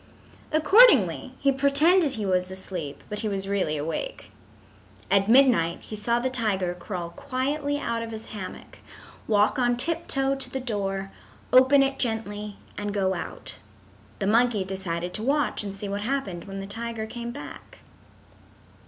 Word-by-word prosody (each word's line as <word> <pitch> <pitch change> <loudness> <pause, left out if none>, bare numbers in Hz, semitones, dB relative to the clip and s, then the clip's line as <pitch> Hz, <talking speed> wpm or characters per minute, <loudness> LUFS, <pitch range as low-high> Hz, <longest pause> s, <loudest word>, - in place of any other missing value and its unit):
Accordingly 305 - +5
he 275 - +2
pretended 285 +4 +4
he 215 -2 -3
was 185 -1 +1
asleep, 180 -6 -6
but 210 - -5
he 220 - -2
was 195 -1 -2
really 185 -6 0
awake. 165 - -5 0.8
At 200 +1 +3
midnight 235 -10 +5
he 215 - -8
saw 235 +3 0
the 240 +2 0
tiger 200 -8 0
crawl 175 -1 -6
quietly 285 - -2
out 235 -5 -2
of 230 - -5
his 220 0 -8
hammock, 200 -3 -8 0.5
walk 210 +4 +3
on 245 -1 +2
tip 335 +6 0
toe 270 0 +1
to 270 -1 -1
the 265 - -4
door, 195 -5 -3 0.4
open 260 +2 +7
it 270 0 -2
gently, 210 -3 -2 0.2
and 205 0 -3
go 190 -2 +1
out. 175 - -7 0.6
The - - -2
monkey 225 0 +3
decided 180 -2 -4
to - - -4
watch 280 0 0
and 200 -1 -6
see 205 - -5
what 200 +1 -3
happened 210 -8 -3
when 195 -1 -7
the - - -6
tiger 225 +2 -4
came 235 +1 -6
back. 285 +5 -10
220 Hz, 160 wpm, -26 LUFS, 195-265 Hz, 0.8 s, open